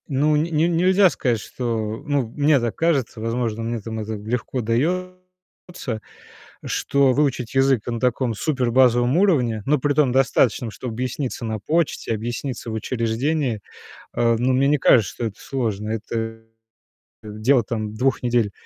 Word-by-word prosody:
Ну, 150 Hz, +2 st, +2 dB
н 150 Hz, -, +2 dB
не 165 Hz, 0 st, +1 dB
нельзя 185 Hz, +3 st, +4 dB
сказать, 120 Hz, -8 st, -1 dB
что 110 Hz, -1 st, -4 dB
ну, 145 Hz, -5 st, 0 dB
мне 145 Hz, -1 st, +4 dB
так 120 Hz, -2 st, -2 dB
кажется, 140 Hz, -9 st, 0 dB
возможно, 115 Hz, -1 st, -2 dB
мне, 115 Hz, 0 st, -2 dB
там, 110 Hz, +1 st, -6 dB
это 110 Hz, +1 st, -4 dB
легко 115 Hz, +4 st, -3 dB
даётся, 180 Hz, 0 st, -4 dB, 0.6 s
что 140 Hz, -2 st, +2 dB
выучить 130 Hz, -4 st, 0 dB
язык 135 Hz, -4 st, +2 dB
на 115 Hz, -1 st, -3 dB
таком 125 Hz, -1 st, 0 dB
супербазовом 125 Hz, 0 st, +2 dB
уровне, 130 Hz, -, +2 dB
но 150 Hz, +1 st, +3 dB
при 145 Hz, +2 st, +1 dB
том 140 Hz, -4 st, +3 dB
достаточном, 125 Hz, -2 st, +2 dB
чтобы 120 Hz, +2 st, -6 dB
объясниться 125 Hz, +1 st, -3 dB
на 110 Hz, -1 st, -2 dB
почте, 155 Hz, +1 st, -1 dB
объясниться 120 Hz, +2 st, -4 dB
в -, -, -4 dB
учреждении, 120 Hz, +3 st, -1 dB, 0.5 s
э, 115 Hz, -1 st, +2 dB
ну, 125 Hz, +3 st, +1 dB
мне 135 Hz, +2 st, +3 dB
не 150 Hz, +1 st, +3 dB
кажется, 115 Hz, -7 st, +4 dB
что 120 Hz, -, -4 dB
это 110 Hz, -2 st, -5 dB
сложно, 110 Hz, -6 st, -3 dB
это 115 Hz, +1 st, -4 dB, 0.8 s
дело, 110 Hz, +5 st, +1 dB
там, 110 Hz, -1 st, -4 dB
2 130 Hz, +4 st, 0 dB
недель, 120 Hz, -4 st, +1 dB
125 Hz, 150 wpm, -22 LUFS, 115-145 Hz, 0.8 s, нельзя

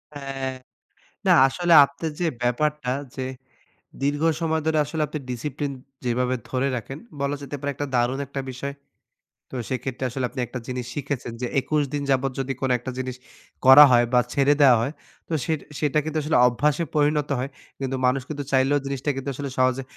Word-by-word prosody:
হ্যাঁ। 135 Hz, -1 st, -4 dB, 0.8 s
না -, -, +6 dB, 0.2 s
আসলে 175 Hz, +4 st, 0 dB
আপনার 140 Hz, +3 st, -4 dB
যে 175 Hz, -, +2 dB, 0.2 s
ব্যাপারটা 135 Hz, +2 st, 0 dB, 0.3 s
যে 130 Hz, -, -3 dB, 0.8 s
দীর্ঘ 145 Hz, +2 st, 0 dB, 0.2 s
সময় 160 Hz, -1 st, +1 dB
ধরে 160 Hz, -1 st, +2 dB
আসলে 155 Hz, +1 st, -3 dB
আপনি 150 Hz, -, -5 dB
ডিসিপ্লিন 145 Hz, +3 st, -3 dB, 0.3 s
যেভাবে 125 Hz, +1 st, +1 dB
ধরে 130 Hz, +1 st, 0 dB
রাখেন, 135 Hz, +5 st, -7 dB, 0.2 s
বলা 140 Hz, +1 st, 0 dB
যেতে 140 Hz, +1 st, -6 dB
পারে 145 Hz, -, -3 dB
একটা 145 Hz, -, -3 dB
দারুন 125 Hz, +3 st, +1 dB
একটা 140 Hz, -1 st, -4 dB
বিষয়। 140 Hz, +2 st, -5 dB, 0.8 s
তো -, -, -7 dB
সেক্ষেত্রে 130 Hz, 0 st, -3 dB
আসলে 130 Hz, +1 st, -2 dB
আপনি 130 Hz, -, -8 dB
একটা 125 Hz, -, -6 dB
জিনিস 125 Hz, -1 st, -4 dB
শিখেছেন 135 Hz, -4 st, -4 dB
যে 125 Hz, -, -1 dB
২১ 150 Hz, +2 st, 0 dB
দিন 145 Hz, -, -1 dB
যাবত 135 Hz, 0 st, +2 dB
যদি 135 Hz, 0 st, -1 dB
কোন 135 Hz, -, 0 dB
একটা 130 Hz, +2 st, -5 dB
জিনিস 130 Hz, -1 st, -3 dB, 0.5 s
করা 130 Hz, +3 st, +11 dB
হয় 120 Hz, 0 st, +5 dB
বা, 125 Hz, -, +6 dB
ছেড়ে 140 Hz, +1 st, +4 dB
দেওয়া 130 Hz, -4 st, +7 dB
হয়, 140 Hz, +6 st, -2 dB, 0.3 s
তো 165 Hz, -, -4 dB
সেট 160 Hz, -2 st, 0 dB, 0.2 s
সেটা 150 Hz, 0 st, +2 dB
কিন্তু 155 Hz, 0 st, -2 dB
আসলে 150 Hz, -, +2 dB
অভ্যাসে 150 Hz, +6 st, +1 dB
পরিণত 150 Hz, 0 st, +2 dB
হয়। 130 Hz, +2 st, -3 dB, 0.3 s
কিন্তু 135 Hz, -1 st, -2 dB
মানুষ 130 Hz, +1 st, +2 dB
কিন্তু 145 Hz, -1 st, -4 dB
চাইলেও 135 Hz, +2 st, +3 dB
জিনিসটা 140 Hz, +1 st, -2 dB
কিন্তু 135 Hz, +1 st, -4 dB
আসলে 140 Hz, 0 st, -4 dB
সহজে 130 Hz, +1 st, +2 dB
135 Hz, 180 wpm, -24 LUFS, 130-145 Hz, 0.8 s, করা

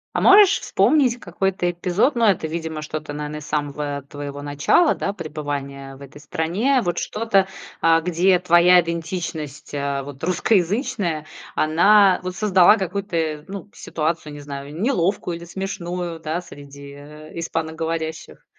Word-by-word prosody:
А -, -, +1 dB
можешь 395 Hz, 0 st, +7 dB
вспомнить 260 Hz, -6 st, +2 dB
какой-то 185 Hz, -2 st, -1 dB
эпизод, 180 Hz, -, +1 dB
но 230 Hz, -2 st, +3 dB
это, 175 Hz, -4 st, 0 dB
видимо, 160 Hz, -1 st, -4 dB
что-то, 155 Hz, 0 st, -6 dB
наверно, 150 Hz, +1 st, -5 dB
из 150 Hz, -, -9 dB
самого 145 Hz, -1 st, -3 dB
твоего 145 Hz, -1 st, -7 dB
начала, 145 Hz, -, +3 dB
да, 200 Hz, -, -3 dB
пребывания 145 Hz, -5 st, -6 dB
в 135 Hz, -, -16 dB
этой 145 Hz, +2 st, -13 dB
стране, 190 Hz, -, 0 dB
вот 175 Hz, -2 st, -1 dB
что-то, 210 Hz, -3 st, +1 dB, 0.3 s
а, 165 Hz, 0 st, +5 dB
где 180 Hz, +2 st, +2 dB
твоя 180 Hz, 0 st, +5 dB
идентичность, 165 Hz, -4 st, -5 dB
э, 140 Hz, -1 st, -2 dB
вот 140 Hz, +1 st, -10 dB
русскоязычная, 185 Hz, -, 0 dB, 0.3 s
она 190 Hz, +5 st, +5 dB
вот 185 Hz, 0 st, -5 dB
создала 195 Hz, 0 st, +5 dB
какую-то, 170 Hz, -6 st, -2 dB
ну, 200 Hz, +1 st, -8 dB
ситуацию, 155 Hz, -1 st, -3 dB
не 145 Hz, -, -9 dB
знаю, 145 Hz, +2 st, -8 dB
неловкую 190 Hz, -6 st, 0 dB
или 170 Hz, -, -10 dB
смешную, 175 Hz, -2 st, -5 dB
да, 160 Hz, +3 st, -3 dB
среди, 140 Hz, -3 st, -12 dB
э, 150 Hz, +2 st, -12 dB
испаноговорящих? 160 Hz, 0 st, -4 dB
165 Hz, 140 wpm, -22 LUFS, 150-190 Hz, 0.3 s, можешь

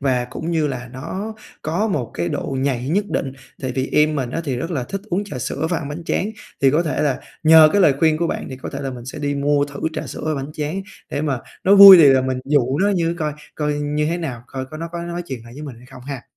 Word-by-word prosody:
và 130 Hz, -3 st, +1 dB
cũng 155 Hz, +6 st, -5 dB
như 160 Hz, -3 st, +1 dB
là 125 Hz, -3 st, -5 dB
nó 190 Hz, +11 st, -5 dB, 0.3 s
có 175 Hz, +8 st, -1 dB
một 130 Hz, -, -2 dB
cái 85 Hz, 0 st, -2 dB
độ 135 Hz, -, -3 dB
nhạy 130 Hz, -2 st, -1 dB
nhất 200 Hz, +6 st, +1 dB
định. 135 Hz, -, -2 dB, 0.3 s
Tại 130 Hz, -1 st, -2 dB
vì 130 Hz, 0 st, -1 dB
em 150 Hz, 0 st, +3 dB
mình 125 Hz, -3 st, -2 dB
á 165 Hz, -, -2 dB
thì 135 Hz, -5 st, -2 dB
rất 165 Hz, +8 st, -4 dB
là 135 Hz, -7 st, -2 dB
thích 195 Hz, +9 st, -5 dB
uống 195 Hz, +4 st, 0 dB
trà 150 Hz, -10 st, -7 dB
sữa 145 Hz, +5 st, -2 dB
và 170 Hz, -, +1 dB
ăn 145 Hz, -, -6 dB
bánh 160 Hz, +3 st, -7 dB
tráng, 205 Hz, +5 st, -1 dB, 0.3 s
thì 135 Hz, -, +6 dB
có 155 Hz, +4 st, +2 dB
thể 155 Hz, -2 st, -1 dB
là 140 Hz, -4 st, 0 dB, 0.2 s
nhờ 160 Hz, 0 st, +8 dB
cái 205 Hz, -, +3 dB
lời 145 Hz, -6 st, +5 dB
khuyên 160 Hz, -1 st, +3 dB
của 170 Hz, +1 st, 0 dB
bạn -, -, -3 dB
thì 130 Hz, -, -6 dB
có 130 Hz, -, -7 dB
thể 140 Hz, -, -4 dB
là 135 Hz, -1 st, -3 dB
mình 120 Hz, -2 st, -9 dB
sẽ 130 Hz, -, -7 dB
đi 145 Hz, -1 st, -1 dB
mua 145 Hz, 0 st, +2 dB
thử 145 Hz, -1 st, -9 dB
trà -, -, -4 dB
sữa -, -, -7 dB
và 155 Hz, -, 0 dB
bánh 140 Hz, +2 st, -5 dB
tráng, 155 Hz, +6 st, -3 dB, 0.3 s
để 145 Hz, -, -2 dB
mà 140 Hz, -4 st, -1 dB, 0.3 s
nó 195 Hz, +2 st, +6 dB
vui 195 Hz, -1 st, +12 dB
thì 165 Hz, -, +7 dB
là 135 Hz, -1 st, +5 dB
mình 130 Hz, 0 st, -2 dB
dụ 140 Hz, -1 st, +1 dB
nó 200 Hz, -, +3 dB
như 170 Hz, -4 st, 0 dB
coi 150 Hz, -1 st, -1 dB, 0.2 s
coi 150 Hz, -1 st, -1 dB
như 145 Hz, +1 st, -1 dB
thế 170 Hz, +2 st, -1 dB
nào, 130 Hz, -8 st, -5 dB
coi 130 Hz, -1 st, -5 dB
có 155 Hz, -, -9 dB
nó 165 Hz, +1 st, -5 dB
có 170 Hz, 0 st, -4 dB
nói 175 Hz, +1 st, -4 dB
chuyện 125 Hz, -4 st, -6 dB
lại 115 Hz, -, -13 dB
với 150 Hz, -, -9 dB
mình 135 Hz, -6 st, -8 dB
hay 125 Hz, +2 st, -16 dB
không 125 Hz, -, -13 dB
ha. 135 Hz, -2 st, -6 dB
145 Hz, 290 wpm, -20 LUFS, 130-165 Hz, 0.3 s, vui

